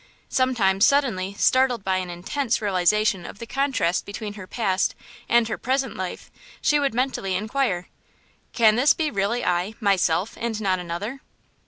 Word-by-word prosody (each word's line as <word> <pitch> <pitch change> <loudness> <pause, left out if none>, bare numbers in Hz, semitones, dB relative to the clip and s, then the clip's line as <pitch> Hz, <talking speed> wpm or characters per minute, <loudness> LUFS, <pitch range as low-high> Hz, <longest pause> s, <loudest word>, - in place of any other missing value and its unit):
Sometimes, 215 -7 +2
suddenly 215 -10 +2
startled 255 -1 +2
by 190 -1 +1
an 185 -1 -3
intense 230 +9 -2
realization 200 -1 +1
of - - -9
the 230 - -7
contrast 255 -10 0
between 205 +1 -6
her 200 -3 -10
past 195 -5 0 0.3
and 235 -1 +4
her 225 - -4
present 265 0 -1
life, 185 -1 -6 0.3
she 295 -1 +2
would 275 -5 0
mentally 245 -7 -1
inquire: 210 -3 -1 0.6
"Can 220 -2 +4
this 275 +4 +5
be 310 -2 -1
really 205 +4 -1
I, 180 +4 0
myself, 195 -2 +1
and 230 -2 -2
not 190 -3 0
another? 180 +10 -5
215 Hz, 155 wpm, -24 LUFS, 185-255 Hz, 0.6 s, this